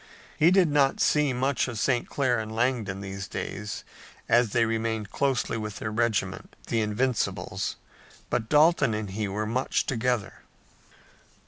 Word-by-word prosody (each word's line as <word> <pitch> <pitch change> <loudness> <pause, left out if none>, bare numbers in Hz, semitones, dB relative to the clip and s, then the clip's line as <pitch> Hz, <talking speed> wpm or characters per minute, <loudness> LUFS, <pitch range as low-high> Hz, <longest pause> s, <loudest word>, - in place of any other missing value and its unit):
He 160 - +5
did 185 -1 +5
not 145 -2 +2
see 150 -2 +3
much 130 +2 0
of 120 -3 -5
St. 120 +2 0
Clair 125 -4 +1
and 110 0 -5
Langdon 110 -4 -1
these 95 0 -6
days, 105 +1 -5 0.4
as 120 0 +4
they 115 +2 +2
remained 110 -2 -2
closely 135 -4 0
with 105 -2 -5
their 110 - -4
regiment, 110 -4 -1
the 115 - +1
Invincibles, 115 +4 -1 0.6
but 110 - -1
Dalton 150 -6 +4
and 105 -2 -4
he 105 +1 -2
were 105 +2 -2
much 125 +4 0
together. 120 -4 -1
115 Hz, 145 wpm, -27 LUFS, 105-130 Hz, 0.6 s, He